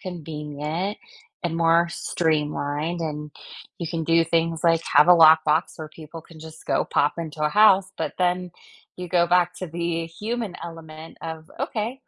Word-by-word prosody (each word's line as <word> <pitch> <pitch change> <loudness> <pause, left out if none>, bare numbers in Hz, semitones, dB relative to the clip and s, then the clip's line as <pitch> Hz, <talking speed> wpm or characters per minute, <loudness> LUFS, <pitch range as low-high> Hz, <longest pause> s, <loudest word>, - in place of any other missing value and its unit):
convenient 160 +2 -5 0.5
and 165 -1 -2
more 170 +1 +3
streamlined, 155 -1 -2
and 150 -2 -5 0.5
you 170 - -4
can 165 -1 -3
do 165 +1 +4
things 165 -1 0
like 165 -1 +3
have 150 +4 +7
a - - +8
lockbox 160 -1 +5
where 155 -1 -7
people 160 +1 -11
can 165 -1 -16
just 160 0 -12
go - - 0
pop 145 - +1
into 155 -2 -5
a 150 - +3
house, 195 -1 +5
but - - -2
then 180 0 0 0.4
you 180 -1 -7
go 175 0 +3
back 175 0 +2
to 185 - -5
the 165 0 -3
human 210 +3 -5
element 160 -1 -10
of, 160 -1 -7
"Okay, 230 +5 -3
165 Hz, 165 wpm, -23 LUFS, 155-175 Hz, 0.5 s, a